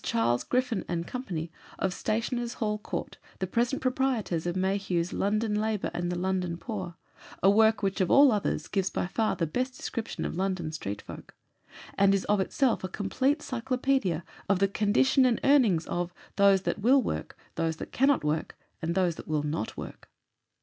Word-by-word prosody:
Charles 115 +1 +1
Griffin 250 -5 0
and 170 -1 -2
Co., 250 +6 -5 0.5
of 190 -1 -1
Stationers' 235 +3 -2
Hall 210 -2 -1
Court, - - -5 0.2
the 190 - -1
present 235 +8 0
proprietors 250 -10 0
of 175 - -1
Mayhew's 190 -2 0
London 210 +2 0
Labour 215 -1 -1
and 175 0 -2
the 175 - -2
London 180 -2 -1
Poor 185 -4 -5 0.5
a 195 - +7
work 220 0 +4
which, 195 +1 0
of 185 - +1
all 280 -1 +7
others, 205 -2 -1
gives 195 -2 0
by - - -2
far 215 +4 0
the 170 - 0
best 255 +11 -2
description 230 -3 -4
of - - -3
LONDON 185 -3 -1
STREET 100 -10 -5
FOLK; - - -11 0.6
and 200 0 +5
is 195 - -1
of 205 -1 +2
itself 235 +5 +1
a - - -1
complete 260 - 0
cyclopædia 255 - 0 0.3
of 200 - +4
the 195 +1 +3
condition 220 +7 +3
and 245 -3 +3
earnings 230 - +4
of 175 0 -3 0.2
those 200 -1 +5
that - - -1
will 255 +5 +4
work, 75 - -4 0.2
those 165 -1 -1
that - - -8
cannot 275 - +3
work, 150 +1 -2 0.2
and 165 +1 -1
those 180 -3 +1
that - - -9
will 150 -1 0
not 150 -5 -3
work. - - -9
195 Hz, 180 wpm, -28 LUFS, 175-235 Hz, 0.6 s, a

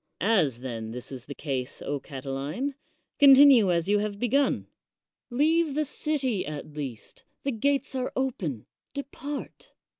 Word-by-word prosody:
As, 165 - +2
then, 115 -4 -5
this 125 +4 -6
is 130 -2 -7
the 140 - -7
case, 130 -4 -3 0.2
Catiline, 140 - -4 0.5
continue 270 - +8
as 170 0 +1
you 205 +1 +3
have 205 -1 -2
begun. 255 +6 +1 0.6
Leave 305 +4 +2
the 305 0 +1
city 275 -7 -1
at 150 0 -7
least; 135 -7 -7 0.2
the 275 - 0
gates 275 +5 0
are 260 -1 -2
open; 185 - -2 0.3
depart. 280 +1 -6
210 Hz, 130 wpm, -27 LUFS, -, 0.6 s, continue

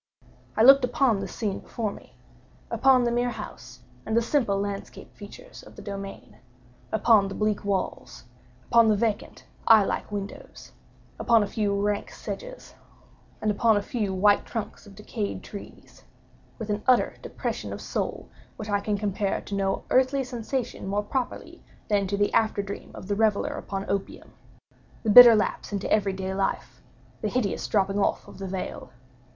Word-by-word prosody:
I 220 - +5
looked 275 +2 +8
upon 245 -3 +2
the 195 - -4
scene 205 0 -3
before 220 -3 -4
me—upon 265 -2 -1
the 240 - +1
mere 245 +1 +1
house, 210 - -9 0.2
and 220 +1 -1
the - - +5
simple 230 -6 +1
landscape 200 0 -6
features - - -12
of - - -15
the - - -11
domain—upon 200 +1 -2
the 195 - -6
bleak 210 -1 0
walls—upon 200 +3 -1
the 215 - +4
vacant 210 0 -2 0.2
eye 220 -2 +8
like - - -3
windows—upon 205 +2 -3
a - - -3
few 200 -2 -1
rank 205 0 -1
sedges—and - - -8
upon 220 +1 +3
a 205 - -1
few 220 -7 -2
white 200 +2 +3
trunks 225 -1 -6
of 200 - -14
decayed 210 0 -5
trees—with 210 +1 -11
an 205 0 -1
utter 255 -2 +3
depression - - -4
of - - -5
soul - - -4 0.3
which 215 -1 -6
I 205 - +2
can 205 0 -1
compare 200 -1 -1
to - - -9
no 195 -1 -1
earthly 265 +1 +3
sensation 245 -3 -4
more 205 +2 -1
properly 250 +4 -4 0.3
than 200 -2 +2
to 200 +2 -2
the 205 0 +1
after 215 -2 +2
dream 200 0 -7
of - - -9
the 205 - 0
reveller 215 0 +1
upon 195 0 -5
opium—the 200 +2 -6
bitter 240 0 +11
lapse 210 - -1
into 200 -1 -1
everyday 190 -2 0
life—the 195 +2 -5
hideous 220 -4 -1
dropping 195 -1 +1
off - - 0
of - - -13
the 195 - -5
veil. 185 -7 -5
210 Hz, 150 wpm, -26 LUFS, 200-230 Hz, 0.3 s, bitter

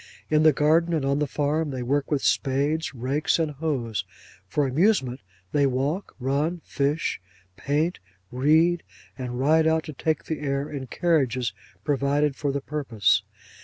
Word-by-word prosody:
In 155 0 +4
the 155 0 +7
garden, 160 +4 +3
and 150 -4 -1
on 140 +1 +1
the 150 - 0
farm, 150 +3 0
they 130 -3 -4
work 140 +3 0
with 145 -3 0
spades, 145 +3 +1
rakes, 135 +5 0
and 160 -2 0
hoes. 130 - -2 0.4
For 145 +8 +1
amusement, 135 - +2 0.3
they 145 -1 +3
walk, 140 +9 -2
run, 145 +7 0
fish, 145 - -1 0.3
paint, 150 - -1 0.3
read, 160 +7 +3 0.3
and 125 -2 -5
ride 155 +4 +4
out 160 0 +2
to 155 - -7
take 155 +3 -1
the 160 - -3
air 140 -1 -1
in 135 -3 -5
carriages 130 -7 +1 0.3
provided 145 0 +1
for 145 -1 -1
the 140 0 -2
purpose. 125 -10 +1
145 Hz, 155 wpm, -25 LUFS, 135-155 Hz, 0.4 s, the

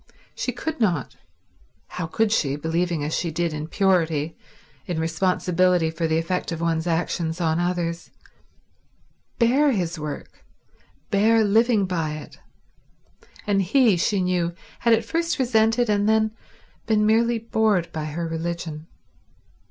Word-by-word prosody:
She 250 - -2
could 315 +6 -5
not—how 165 - -5
could 220 +6 0
she, 140 -10 +1
believing 165 +1 -1
as 150 +2 -3
she 170 - -1
did 165 +1 -1
in 150 0 -4
purity, 165 -5 +1 0.5
in 175 -3 -2
responsibility 180 0 +1
for 165 0 -2
the 160 0 +1
effect 180 +2 -2
of 165 - -4
one's 165 0 -1
actions 165 0 -1
on 165 -1 +1
others—bear 175 -1 -2 1.6
his 175 -5 -2
work, 150 -1 -7 0.7
bear 220 +2 +4
living 220 0 +3
by 165 -4 -2
it; 155 - -11 1.1
and 200 -1 +2
he 220 +2 +4
she 190 +3 +1
knew, 175 -2 0 0.2
had 235 -1 +4
at 225 0 -3
first 330 +6 -1
resented 235 -2 +2
and 205 0 +2
then 220 0 +3 0.6
been 215 -1 +3
merely 230 +2 +3
bored 220 -5 0
by 155 -1 -4
her 165 +2 -3
religion. 165 -1 -4
175 Hz, 130 wpm, -23 LUFS, 165-215 Hz, 1.6 s, bear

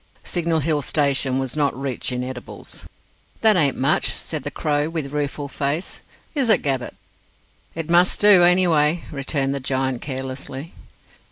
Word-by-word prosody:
Signal 165 -2 -1
Hill 150 0 0
station 140 -3 +1
was 135 0 -2
not 145 -3 0
rich 135 -2 -3
in 125 0 -2
edibles. 125 -1 -7 0.5
"That 220 -1 +6
ain't 145 -6 +3
much," 140 +4 +2
said 155 -2 -4
the 145 - -4
Crow, 145 +1 -1
with 155 -4 -4
rueful 145 0 -3
face. 145 +5 -3 0.3
"Is 275 -6 0
it, 220 - +4
Gabbett?" 135 -3 -2 0.8
"It 165 -1 -4
must 175 +1 +4
do, 205 -3 +7
any 180 +1 +5
way," 155 0 +2
returned 135 -1 -1
the 140 - -3
giant 130 -1 -2
carelessly. 135 +2 -5
145 Hz, 155 wpm, -22 LUFS, 135-165 Hz, 0.8 s, do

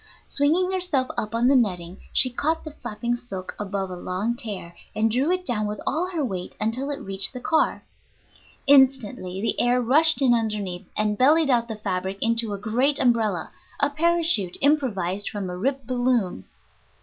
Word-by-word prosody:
Swinging 330 +6 +1
herself 355 -9 0
up 215 +2 -3
on 235 +2 +2
the 275 - +4
netting, 180 -7 0
she 255 - +4
caught 315 +6 -1
the 310 - -7
flapping 240 -3 -4
silk 195 -7 -8
above 195 -2 -3
a - - -5
long 185 +6 -3
tear, 205 -8 -7 0.2
and 220 +1 +1
drew 260 +7 +1
it 365 0 -1
down 215 -6 -1
with 210 0 -5
all 350 +5 -1
her 325 -6 -2
weight 185 -6 -5
until 230 +6 -1
it 285 - -3
reached 195 +3 -2
the 250 - -6
car. 320 +5 0 0.8
Instantly 255 -9 +3
the 225 - +2
air 245 +1 +3
rushed 305 +7 +5
in 260 -3 +4
underneath, 210 -6 -2
and 210 -1 0
bellied 295 +3 +4
out 235 -1 +2
the 220 - -5
fabric 190 -2 -3
into 230 -1 +1
a 200 - -3
great 245 +8 +1
umbrella, 225 -7 +1 0.3
a 285 0 +2
parachute 325 - +2
improvised 205 - +1
from 205 -2 -5
a - - -5
ripped 265 +7 -2
balloon. 245 - 0
235 Hz, 175 wpm, -24 LUFS, 205-280 Hz, 0.8 s, rushed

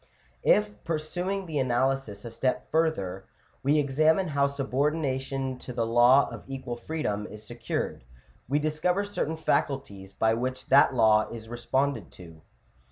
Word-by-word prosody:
If, 210 0 +2
pursuing 175 +5 -2
the 155 -4 -2
analysis 130 -4 0
a 115 - -6
step 125 +3 -2
further, 100 - 0 0.4
we 145 +3 +3
examine 155 +5 +2
how 140 -1 +2
subordination 135 -1 -1
to 125 - -8
the 115 -1 0
law 120 +4 +5
of - - -8
equal 130 -2 -5
freedom 120 -6 -3
is 105 0 -11
secured, 120 - -4 0.5
we 145 - +2
discover 155 +6 0
certain 180 -5 -3
faculties 135 -11 -1
by 110 +2 +2
which 130 +3 -3
that 135 0 +6
law 110 -2 +4
is 110 -1 -9
responded 130 +4 -1
to 85 -3 -12
(Chap. - - -22
135 Hz, 145 wpm, -27 LUFS, 115-155 Hz, 0.5 s, that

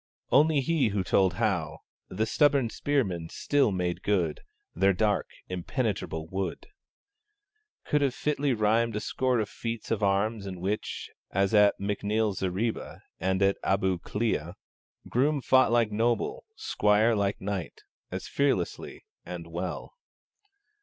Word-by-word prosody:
Only 150 0 +5
he 160 -2 +2
who 100 -2 -1
told 95 -1 +2
how 90 -8 -1 0.3
The 110 +4 -1
stubborn 140 -1 +3
spearmen 95 - -1
still 140 -6 +1
made 90 -1 -2
good 90 -7 0 0.3
Their 95 +3 +3
dark 105 +3 +1 0.2
impenetrable 90 -3 -2
wood 95 +2 -4 1.2
could 150 - +1
have 135 -3 +1
fitly 145 -2 0
rhymed 110 +1 +2
a - - 0
score 130 +3 0
of 105 - -1
feats 115 +2 -5
of 115 - 0
arms 100 +1 +1
in 95 -2 -6
which, 100 +4 -3 0.2
as 100 +2 +1
at 105 -1 +5
M'Neill's 105 +1 -1
Zareeba 95 +5 -2 0.2
and 95 +2 +1
at 100 0 +3
Abu 95 -2 +1
Klea, 90 -6 -2 0.5
Groom 140 +4 +2
fought 130 -2 +4
like 120 -2 +3
noble, 120 - 0
squire 105 - +2
like 100 -1 0
knight, 95 -5 -4 0.3
As - - -5
fearlessly 135 -11 -1 0.2
and 90 -2 -7
well. 85 +2 -5
105 Hz, 135 wpm, -28 LUFS, 95-120 Hz, 1.2 s, Only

